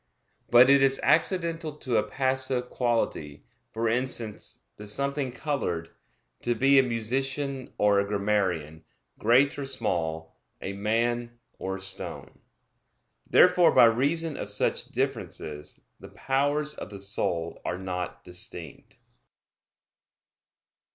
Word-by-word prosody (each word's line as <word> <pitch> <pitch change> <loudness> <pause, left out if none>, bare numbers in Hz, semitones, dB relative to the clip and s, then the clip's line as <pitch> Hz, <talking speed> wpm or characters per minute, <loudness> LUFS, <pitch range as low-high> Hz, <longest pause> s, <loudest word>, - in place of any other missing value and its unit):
But 120 +1 +8
it 140 0 +6
is 135 0 +4
accidental 165 -2 +2
to 130 -6 -1
a - - +4
passive 130 0 -1
quality, 115 - -1 0.3
for 115 +1 -1
instance, 115 -2 -2 0.2
to 105 - -9
something 140 +4 0
colored, 120 - -3 0.5
to 120 0 0
be 135 +4 +5
a - - +5
musician 130 +3 -2
or 105 -1 +4
a 100 - 0
grammarian, 95 -7 -1 0.4
great 130 +6 +3
or 140 - -4
small, 80 -10 -3 0.2
a 100 - -5
man 120 +3 -1 0.2
or 95 0 -3
a - - -7
stone. 95 0 -7 0.9
Therefore 180 -1 +5
by - - +9
reason 145 +7 +1
of 100 - -5
such 100 - -1
differences 75 0 -4 0.2
the - - -11
powers 145 +3 0
of - - -8
the 100 - -8
soul 95 -4 -2
are 90 - -3
not 90 -1 -5
distinct. 90 -3 -8
120 Hz, 120 wpm, -27 LUFS, 95-135 Hz, 0.9 s, by